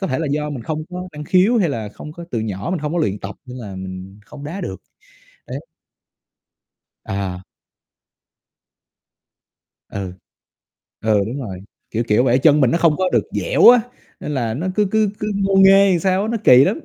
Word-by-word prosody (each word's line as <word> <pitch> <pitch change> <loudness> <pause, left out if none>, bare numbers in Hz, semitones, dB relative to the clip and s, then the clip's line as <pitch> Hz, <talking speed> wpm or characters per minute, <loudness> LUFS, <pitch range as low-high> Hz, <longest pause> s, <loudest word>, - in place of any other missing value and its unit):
có 190 - -1
thể 130 - -1
là 160 - -2
do 150 +1 -1
mình 135 -5 -6
không 155 +5 -3
có 180 +1 -6
năng 150 0 -7
khiếu, 190 +9 +3
hay 190 -6 +2
là 110 -7 -4
không 150 +8 -10
có 170 +2 -9
từ 115 - -2
nhỏ 105 - -4
mình 185 - -1
hông 150 +1 -4
có 175 - 0
luyện 105 - 0
tập 100 +1 -7
nên 125 0 -9
là 100 -5 -8
mình 95 +2 -8
không 145 -1 -11
đá 170 +7 -5
được, 95 - -6 0.6
đấy. - - -5 1.5
À. 95 -2 -4 2.5
Ừ. 95 -2 -5 0.9
Ừ, 110 -1 +2
đúng 125 +6 -5
rồi, 100 -8 -6 0.3
kiểu 115 +1 -1
kiểu 105 +4 +3
vậy, 125 +1 +3
chân 150 +1 +4
mình 125 -3 +4
nó 170 - +1
không 165 -3 +3
có 185 - +1
được - - +2
dẻo - - +4
á, 245 0 +8 0.4
nên - - -5
là 115 -4 -1
nó 165 +9 -3
cứ 210 -2 +2
cứ 220 0 +2
cứ 210 - -3
ngô 195 0 0
nghê 195 +1 +7
làm 180 - +3
sao 190 +2 +1
á, 215 - -2
nó 235 - 0
kỳ 125 +2 +8
lắm. 320 - -1
150 Hz, 205 wpm, -20 LUFS, 110-185 Hz, 2.5 s, á